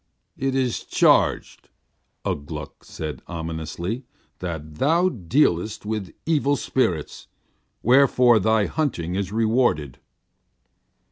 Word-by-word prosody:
"It 135 0 -1
is 130 -3 0
charged," - - +2 0.6
Ugh 70 - -2
Gluk 75 -3 -8
said 75 -4 -6
ominously, 85 - -4 0.4
"that 80 -4 -6
thou 170 +6 +3
dealest 105 - 0
with 105 -5 -4
evil 145 -3 +2
spirits, 90 - -1 0.6
wherefore 125 -2 +5
thy 110 +1 +2
hunting 95 - -2
is 95 0 -2
rewarded." 110 - +1
105 Hz, 95 wpm, -23 LUFS, 80-130 Hz, 0.6 s, wherefore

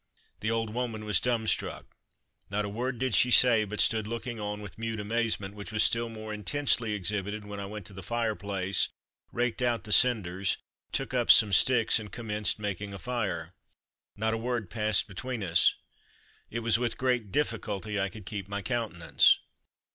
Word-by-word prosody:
The 110 - -1
old 115 -1 -1
woman 115 -3 -3
was 105 -4 +3
dumb 120 -3 0
struck. - - -1 0.6
Not 105 +1 -1
a - - -4
word 120 +4 -3
did 130 -1 -1
she 125 +5 +5
say, 120 -3 +6
but 105 +1 -6
stood 110 -2 +3
looking 115 +1 -4
on 105 0 -3
with 105 -1 -10
mute 115 -1 -3
amazement, 105 -2 -1
which 105 0 -8
was 110 -1 +2
still 115 0 +2
more 110 -1 -7
intensely 115 +1 0
exhibited 105 +1 -2
when 105 -1 -7
I 100 - -5
went 105 -1 -7
to 100 - -10
the 95 - -8
fire 115 +3 -1
place, 100 -2 0 0.4
raked 120 +1 -1
out 120 -2 +1
the 105 - -7
cinders, 100 -6 +3 0.3
took 120 - -3
up 120 -2 0
some 105 -2 +7
sticks 120 +2 +4
and 105 -2 -9
commenced 105 -2 -2
making 105 -1 -4
a - - -6
fire. 105 -8 -3 0.6
Not 110 +1 0
a - - 0
word 115 -5 -2
passed 110 -1 +1
between 115 +3 -5
us. 85 -2 +4 0.7
It 115 - -3
was 115 0 +2
with 120 -2 -1
great 125 -5 0
difficulty 105 -7 -1
I 95 0 0
could 105 +1 -11
keep 100 -2 -5
my 100 0 -4
countenance. 115 -8 +3
110 Hz, 185 wpm, -29 LUFS, 100-115 Hz, 0.7 s, some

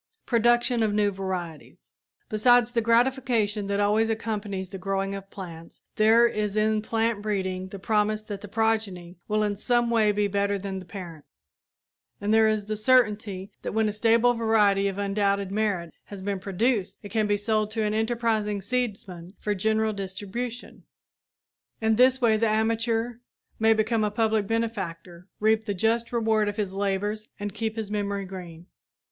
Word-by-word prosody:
PRODUCTION 240 0 +2
OF 215 -2 +1
NEW 205 -1 +2
VARIETIES 185 -4 -6 0.3
Besides 245 +2 +4
the 235 -1 +1
gratification 230 -3 +1
that 200 0 -1
always 210 +2 +2
accompanies 210 -4 -3
the 195 -1 -7
growing 195 +1 -2
of 195 0 -7
plants, 170 -4 -10
there 225 +2 +6
is 210 -2 -2
in 215 0 +2
plant 225 -1 -1
breeding 190 -3 -2
the 200 - -8
promise 215 +1 0
that 205 -2 -7
the 205 - -8
progeny 205 -5 -1
will 215 0 +1
in 205 -1 -1
some 240 +2 +1
way 220 -2 +4
be 205 0 +1
better 200 0 0
than 195 -1 -5
the 185 - -12
parent, 170 -6 -8 1.0
and 205 +1 0
there 220 0 +5
is 215 -1 0
the 215 +1 -3
certainty 210 -4 +1
that - - -4
when 220 0 +2
a - - 0
stable 230 +3 +3
variety 210 -4 +3
of 195 -1 -3
undoubted 200 -1 0
merit 200 -5 -1
has 200 -2 -9
been 200 -1 -2
produced 200 +1 -1
it 205 - -8
can 220 -2 +1
be 205 0 +2
sold 215 0 0
to 220 0 -2
an 210 0 0
enterprising 220 -2 0
seedsman 195 -5 -4
for 210 - -1
general 220 +2 +1
distribution. 205 +5 -6 1.0
In 220 0 +2
this 255 +2 +5
way 225 -4 +3
the 225 0 +2
amateur 225 +2 0 0.4
may 220 0 +4
become 220 0 +1
a 210 - +1
public 220 -1 +1
benefactor, 185 -6 -4
reap 220 +1 +2
the 205 - -1
just 230 +4 0
reward 220 -3 +1
of 205 - -6
his 200 -3 -2
labors 205 +2 -2
and 205 -1 -4
keep 220 0 -3
his 220 -2 -5
memory 200 -1 -2
green! 175 -3 -9
210 Hz, 170 wpm, -26 LUFS, 195-225 Hz, 1.0 s, there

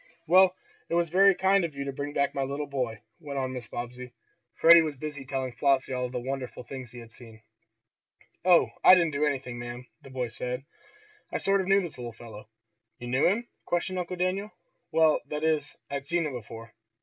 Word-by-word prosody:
"Well, 185 +2 +6 0.3
it 170 - 0
was 170 -2 +1
very 195 +1 +6
kind 190 +1 +3
of 160 -4 -4
you 140 - -3
to 140 - -4
bring 145 +2 -4
back 140 -1 0
my 140 - -2
little 140 +2 -2
boy," 125 -6 -3 0.2
went 145 -4 -6
on 130 -1 -2
Mrs. 120 -3 -7
Bobbsey. 125 +1 -7 0.4
Freddie 170 0 +8
was 155 -2 -2
busy 145 -1 -6
telling 130 -1 -2
Flossie 135 +2 +1
all 125 -1 -2
the 125 0 -4
wonderful 130 0 -5
things 130 0 -8
he 120 - -13
had 115 -1 -11
seen. 110 -2 -14 1.0
"Oh, 180 -1 +5
I - - +10
didn't 170 -3 +2
do 150 +1 +1
anything, 130 -4 -3
ma'am," 120 +1 -7 0.2
the 135 - -13
boy 130 -2 -3
said. 125 +3 -5 0.7
"I - - -1
sort 195 0 +2
of 185 - -5
knew 195 +1 +4
this 170 -8 -7
little 120 -1 -6
fellow." 110 -1 -12 0.5
"You 120 - -7
knew 130 +3 +3
him?" 225 +6 0 0.2
questioned 180 +2 -1
Uncle 180 +1 -4
Daniel. 185 +3 -1 0.4
"Well, 160 -1 +4
that 150 +1 -4
is 155 -2 +1 0.2
I'd 140 0 -4
seen 170 +1 +1
him 150 - -3
before." 115 -1 -9
140 Hz, 205 wpm, -28 LUFS, 125-170 Hz, 1.0 s, I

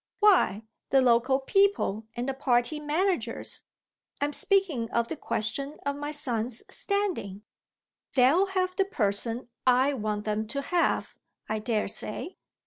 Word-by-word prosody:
"Why, 375 - +4 0.3
the 270 - +5
local 255 +1 +3
people 270 - +1
and 240 +2 -3
the 270 - -1
party 260 +2 +1
managers. 300 - -1 0.6
I'm 290 +1 -1
speaking 330 - +1
of 235 0 0
the - - -3
question 275 +3 -2
of 280 0 -1
my 290 +1 -5
son's 245 -6 -1
standing." 365 - -2 0.7
"They'll 285 +10 +5
have 370 -1 -1
the 390 - +2
person 230 - -1 0.2
I 255 +3 +4
want 210 -4 -3
them 215 0 -1
to 280 +5 -3
have, 345 +4 0 0.3
I 215 0 -2
daresay. 215 - 0
265 Hz, 135 wpm, -27 LUFS, 225-325 Hz, 0.7 s, the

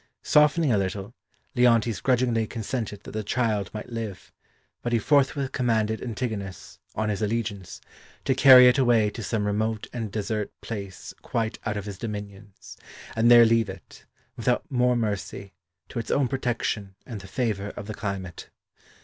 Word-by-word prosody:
Softening 150 0 +4
a 105 - +3
little, 95 +3 -3 0.4
Leontes 115 -4 +3
grudgingly 120 -3 +2
consented 110 -2 -4
that - - -9
the 110 0 -3
child 105 -4 0
might 110 +3 -7
live, 115 -4 -6 0.5
but 120 - -2
he - - +5
forthwith 140 +2 +2
commanded 110 -3 0
Antigonus, 110 -5 -5 0.2
on 110 0 -1
his 105 0 -2
allegiance, 105 -3 -3 0.5
to 135 - +3
carry 130 -1 +9
it 125 +2 +4
away 115 -5 +3
to 115 - -7
some 110 -1 -1
remote 110 +1 -1
and 115 -4 -4
desert 105 0 -2
place 100 -4 -7
quite 115 -1 -2
out 105 -2 -1
of 100 - -5
his 100 -3 -7
dominions, 105 -2 -8 0.4
and 115 +1 +4
there 120 -1 +9
leave 115 -2 +3
it, 95 -2 -11 0.3
without 120 +1 0
more 125 -1 +3
mercy, 100 -3 -3 0.4
to - - -4
its 115 - -6
own 140 -2 +2
protection 120 -6 -2
and 115 -6 -7
the 95 - -11
favour 105 -2 -2
of 100 - -6
the 110 - -5
climate. 100 -5 -5
110 Hz, 160 wpm, -26 LUFS, 105-120 Hz, 0.5 s, carry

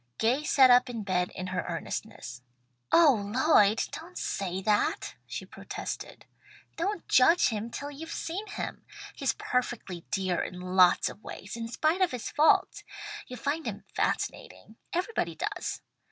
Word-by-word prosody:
Gay 245 +6 +2
sat 265 -4 +6
up 250 +1 +6
in 230 -3 -4
bed 180 -2 0
in 185 - -4
her 185 0 -2
earnestness. 125 +1 -5 0.5
"Oh 290 -10 +6
Lloyd, 215 -1 +4
don't 350 +3 -8
say 190 -1 -2
that!" 210 +1 +1
she - - -5
protested. - - -7 0.5
"Don't 375 +2 -2
judge 330 +8 +5
him 220 0 -3
till 285 +4 -6
you've 320 +3 -8
seen 385 +6 -4
him. - - -5 0.3
He's 275 - 0
perfectly 235 -8 -2
dear 185 -3 0
in 180 - -6
lots 180 0 +4
of - - -8
ways, 205 - -8
in 230 -1 -4
spite 310 +9 +1
of 370 - +4
his 250 -3 -5
faults. 305 +1 +3 0.4
You'll 250 - -7
find 290 +6 -2
him - - -5
fascinating. 220 - -3
Everybody 370 +6 -1
does. - - -3
245 Hz, 150 wpm, -29 LUFS, 195-310 Hz, 0.5 s, sat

